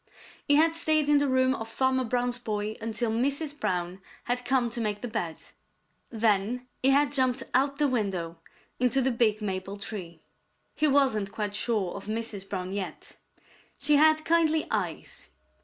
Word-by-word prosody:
He 285 - +5
had 320 +2 +4
stayed 310 -2 +1
in 295 -1 +5
the 285 - +1
room 260 0 +3
of 225 -4 -5
Farmer 260 +2 +1
Brown's 245 +1 -1
boy 215 -2 -3
until 225 +1 -2
Mrs. 280 +5 -1
Brown 180 +1 -2 0.2
had 245 +1 -1
come 245 -2 +1
to 235 - -2
make 210 -2 -2
the 245 - -3
bed. 170 -7 -3 0.7
Then 225 +2 +1 0.2
he 265 - +4
had 280 +1 +4
jumped 260 -2 +1
out 275 +2 +2
the 295 0 +3
window 190 -9 -2 0.4
into 250 +2 +3
the 265 - +2
big 220 -3 +1
maple 195 0 -3
tree. 185 -5 -7 0.5
He 305 +1 +2
wasn't 265 -8 +2
quite 210 -1 -3
sure 210 -5 -1
of 200 - -8
Mrs. 215 -3 -4
Brown 185 -1 -4
yet. 190 -5 -6 0.6
She 290 +1 +3
had 310 +1 +4
kindly 320 -2 +3
eyes. - - -3
240 Hz, 165 wpm, -28 LUFS, 205-275 Hz, 0.7 s, He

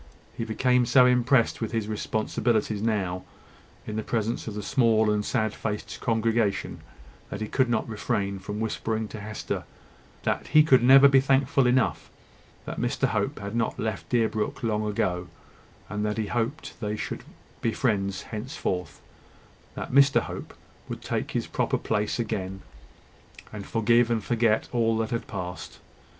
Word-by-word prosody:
He 115 - -3
became 125 +2 +2
so 125 +1 +6
impressed 125 -1 +3
with 115 - -3
his 110 -2 -1
responsibilities 110 0 -1
now, 95 -5 -1 0.6
in 105 - -4
the - - 0
presence 115 0 -2
of 110 - -5
the 105 - -4
small 110 -4 +3
and 105 0 0
sad 110 0 0
faced 105 -2 -4
congregation, 115 -2 0 0.5
that - - -5
he 110 - -3
could 130 +2 +1
not 115 -2 0
refrain 105 -3 -2
from 105 +2 -5
whispering 110 0 -2
to 110 - -7
Hester, 105 +1 -4 0.6
that - - -1
he 155 0 +6
could 130 -5 +5
never 135 +3 +8
be 135 -1 +6
thankful 135 0 +3
enough 125 0 +1 0.6
that - - -5
Mr - - 0
Hope - - -1
had 100 +2 -5
not 115 -1 0
left 110 -3 -3
Deerbrook 115 0 0
long 110 -1 0
ago, 90 -3 -1 0.6
and 105 0 -3
that 105 0 -1
he 110 - 0
hoped 120 +6 -2
they 105 -2 -2
should - - -5 0.4
be 115 - +1
friends 100 -6 0
henceforth, 105 - -4 0.8
that - - -5
Mr 140 +1 +5
Hope - - -7 0.3
would - - -6
take - - -2
his - - -1
proper - - 0
place 105 0 -1
again, 95 -5 -3 0.9
and 105 -2 -7
forgive 115 +1 +3
and 115 -3 0
forget 115 -1 +1
all 115 -2 +2
that 110 0 -2
had 115 - -2
passed. 90 -4 -6
110 Hz, 160 wpm, -26 LUFS, 105-120 Hz, 0.9 s, never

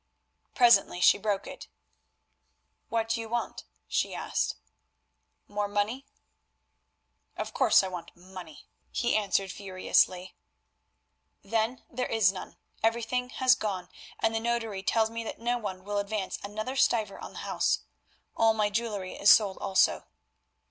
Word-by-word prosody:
Presently 235 -7 +5
she 180 - +6
broke 205 -2 -1
it. - - -9 1.2
"What 225 -1 -1
do 230 0 0
you 225 - -8
want?" 240 +1 -3 0.2
she - - -1
asked. - - -1 0.9
"More 205 0 -2
money?" 210 +7 -2 1.3
"Of - - -4
course - - +5
I - - -2
want 180 -2 -8
money," 180 -3 -11 0.2
he 240 - 0
answered 195 -2 +1
furiously. 185 -1 0 1.1
"Then 225 +4 -1
there 250 +1 -3
is 220 -4 +4
none; 190 - -9 0.2
everything 235 +2 0
has 255 0 +4
gone, 190 -6 -3 0.3
and 225 0 +1
the 225 - 0
notary 225 -4 -2
tells 220 +2 +1
me 230 0 -4
that - - -6
no 240 +1 0
one 190 -4 -6
will 205 +1 -2
advance 200 -1 -3
another 215 +6 -5
stiver 220 -6 +1
on - - -9
the - - -8
house. - - +1 0.5
All 225 -1 +4
my 210 -1 +1
jewellery 205 -4 -2
is 200 - +3
sold 205 -4 +6
also." 195 -2 +2
215 Hz, 140 wpm, -28 LUFS, 195-230 Hz, 1.3 s, she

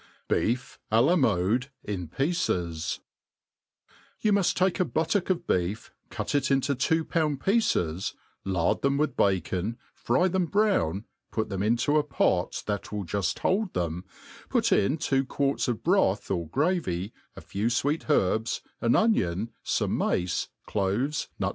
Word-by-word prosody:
Beef 125 +3 -1
Alanade 120 - +3 0.2
in 95 -5 -4
Pieces, 90 - -1 1.2
YOU 210 -1 +2
muft 200 -3 +2
take 185 +1 +1
a - - +5
buttock' 165 +3 0
of 175 -2 0
beef, 90 - -1 0.2
cut - - -4
it 140 -2 +1
into 135 +1 +2
two 160 +5 +1
pound 155 -5 0
pieces, 95 - +1 0.3
lard 95 -3 0
them 140 0 +2
with 150 +1 0
bacon, 95 +3 0 0.2
fry 155 +10 +1
them 185 -1 0
brown, 160 - +1 0.3
put 110 - -2
them 95 -2 -3
into 120 +8 +2
t 150 - -14
pot 90 -8 +1
that 105 -2 -3
will 105 -2 -3
juft 95 +1 -1
hold 195 0 0
them, 85 0 -2 0.5
put - - +2
in 135 +10 +3
two 135 -3 +1
quarts 140 +1 0
of 120 -3 -2
broth 170 - +2
or 85 -4 -1
gravy, 115 - -1 0.2
a - - -9
few 100 +3 -2
fweet 145 +7 0
herbs, 110 -4 +1 0.2
an 115 - +3
onion, 115 - +2
fome - - 0
mace, 90 0 0 0.2
cloves, 105 +9 -1
nut - - 0
120 Hz, 145 wpm, -27 LUFS, 95-160 Hz, 1.2 s, a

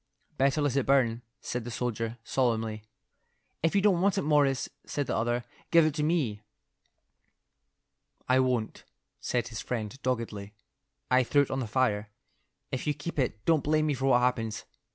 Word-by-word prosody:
"Better 140 +2 +2
let 140 -3 +1
it 140 - +1
burn," 120 -4 +3 0.2
said 125 -1 -3
the 120 - -6
soldier, 115 -1 -3
solemnly. 115 -4 0 0.8
"If 165 +4 +1
you 200 - +4
don't 190 -5 +4
want 200 +1 +2
it, 195 - +1
Morris," 145 -3 +2 0.2
said 145 - -2
the - - -2
other, 120 +1 0 0.3
"give 165 -2 +6
it 155 - +1
to 150 - -2
me." 150 -10 0 1.9
"I 130 +1 +4
won't," 125 -4 0 0.4
said 120 -1 -1
his 110 -2 -5
friend, 115 -2 -4
doggedly. 110 -5 -3 0.6
"I 130 0 +6
threw 140 +3 +3
it - - -6
on 130 - -1
the 125 - -2
fire. 105 -3 0 0.6
If 130 +2 -3
you 150 - +1
keep 150 +1 -5
it, 115 -5 -1
don't 160 -4 +3
blame 155 +1 +2
me 150 - +1
for 135 0 -2
what 125 -2 +5
happens. 115 -3 -1
130 Hz, 175 wpm, -29 LUFS, 115-145 Hz, 1.9 s, give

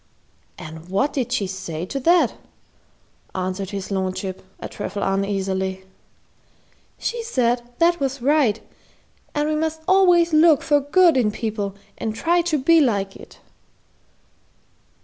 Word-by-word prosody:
"And 160 +2 -10
what 200 +10 0
did 250 -3 -2
she 230 -5 0
say 180 -3 -5
to 275 - -4
that?" 340 +6 +3 1.0
asked 185 +1 -3
his 195 -1 -6
lordship, 190 0 -3 0.2
a - - -6
trifle 205 0 -5
uneasily. 195 -1 -1 1.1
"She 470 0 -3
said 245 - 0 0.2
that 345 +1 +3
was 275 0 -2
right, 260 -4 +2 0.8
and 295 0 +1
we 310 - 0
must 320 +1 -2
always 355 -3 +4
look 310 -2 +5
for 295 -2 +3
good 320 +2 +4
in 235 -4 +3
people 210 -2 -3 0.2
and 220 -1 -3
try 340 +8 +2
to 335 -3 0
be 320 +4 +4
like 200 -7 0
it." - - -14
245 Hz, 130 wpm, -22 LUFS, 195-315 Hz, 1.1 s, look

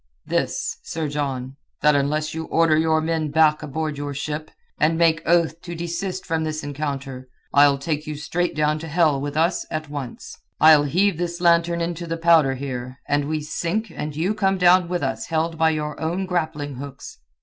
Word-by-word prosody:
"This, - - -1
Sir 160 -1 -4
John, 135 -2 -3 0.3
that 150 0 +6
unless 150 +2 0
you 160 0 -4
order 165 -1 +3
your 160 0 +2
men 160 -1 -1
back 155 0 +3
aboard 150 0 -3
your 145 -1 -4
ship, 150 +2 -4 0.3
and 160 +2 +3
make 165 -2 +3
oath 170 -1 +2
to 170 -1 -7
desist 175 +3 -4
from 160 -2 -1
this 155 -1 -3
encounter, 140 -3 -5 0.3
I'll 140 -1 +6
take 150 +2 -3
you 155 - -4
straight 175 +4 -2
down 150 0 +1
to 165 - -7
hell 155 -3 +2
with 145 +1 -4
us 170 +3 +2
at 155 -1 -4
once. 140 -5 -7 0.2
I'll 155 -1 +7
heave 180 +4 +1
this 175 0 -3
lantern 170 0 +3
into 170 0 -3
the 165 0 -2
powder 165 -5 +4
here, 130 -1 -5
and 145 0 +1
we 155 0 -1
sink 170 +8 -2
and 150 -1 -4
you 175 +7 0
come 195 -2 +1
down 180 0 +5
with 175 -3 -1
us 135 0 -2
held 160 0 -1
by 160 0 +5
your 150 -1 -3
own 175 +4 -1
grappling 155 -6 -2
hooks. 140 - -9
155 Hz, 190 wpm, -23 LUFS, 145-170 Hz, 0.3 s, I'll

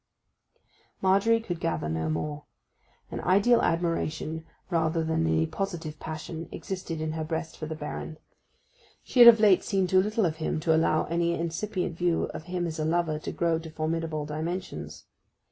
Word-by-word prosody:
Margery 200 +4 +3
could 175 -7 -5
gather 165 - -1
no 80 0 -1
more. 145 - -3 0.7
An - - -4
ideal 200 +6 +4
admiration 165 -1 -1 0.3
rather 165 -1 +1
than 160 - 0
any 80 0 +2
positive 165 - -4
passion 160 +1 -6
existed 180 -4 -5
in 155 0 -2
her 160 0 -3
breast 160 +1 -4
for 155 - -6
the 160 - -4
Baron: 155 +1 -6 0.9
she 255 - -2
had 240 - +11
of 230 -1 +10
late 205 -4 +5
seen 195 -2 +1
too 185 +1 +4
little 210 +1 +1
of 160 -2 -1
him 160 0 -1
to 160 0 +3
allow 160 -1 +3
any 170 +1 0
incipient 170 +1 -3
views 175 -2 +1
of 155 - -7
him 180 0 -2
as 160 -1 -4
a - - 0
lover 160 -1 0
to - - -5
grow 165 -1 +1
to 160 0 -9
formidable 155 -1 -2
dimensions. 160 +5 -5
165 Hz, 170 wpm, -27 LUFS, 155-180 Hz, 0.9 s, had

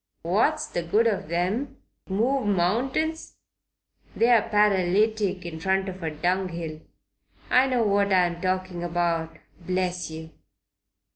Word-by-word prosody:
What's 230 - +1
the 175 - -3
good 205 +7 +2
of 200 -7 -1
'em? 215 +11 -1 0.3
Move 235 +5 0
mountains? 250 - 0 0.8
They're 230 -1 +3
paralytic 205 -1 +2
in 160 -2 -6
front 190 +2 0
of 185 0 -8
a 165 - -2
dunghill. 170 -1 -2 0.7
I 255 +1 +5
know 250 -3 +1
what 200 -1 +2
I'm 175 -2 +2
talking 185 -1 -2
about, 170 -1 -1 0.3
bless 180 0 -2
yer. 160 0 -9
185 Hz, 120 wpm, -25 LUFS, 175-220 Hz, 0.8 s, I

